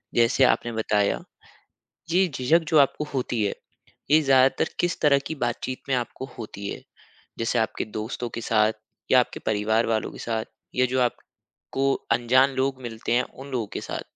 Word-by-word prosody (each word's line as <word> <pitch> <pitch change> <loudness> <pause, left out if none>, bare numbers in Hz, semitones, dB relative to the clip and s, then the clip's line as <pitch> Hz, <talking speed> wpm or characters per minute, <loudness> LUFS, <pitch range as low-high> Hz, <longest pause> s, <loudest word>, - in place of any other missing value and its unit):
जैसे 120 +3 +4
आपने 120 -2 +3
बताया, 105 -2 +1 0.9
ये 185 +3 +4
झिझक 155 +4 +2
जो 155 - +4
आपको 140 +2 +2
होती 120 -4 -1
है, 100 - -1 0.6
ये 155 +1 +7
ज़्यादातर 135 +2 +4
किस 175 0 0
तरह 140 -2 +5
की 160 - -4
बातचीत 130 +2 -3
में 130 - +3
आपको 125 +2 -3
होती 100 -3 -7
है, - - -6 0.6
जैसे 115 +1 0
आपके 110 -1 -1
दोस्तों 115 +2 -4
के 115 - -3
साथ 110 -1 +2 0.4
या 130 - +8
आपके - - -3
परिवार 110 +2 +1
वालों 110 -1 -1
के - - -11
साथ 110 -1 -2 0.3
या 130 0 +3
जो 130 +1 0
आपको 135 +2 -3 0.2
अनजान 125 +3 +4
लोग 130 0 -1
मिलते 115 -1 -4
हैं, 125 - +4
उन 135 +3 -12
लोगों 120 -4 -1
के - - -2
साथ? - - -5
125 Hz, 175 wpm, -25 LUFS, 115-135 Hz, 0.9 s, या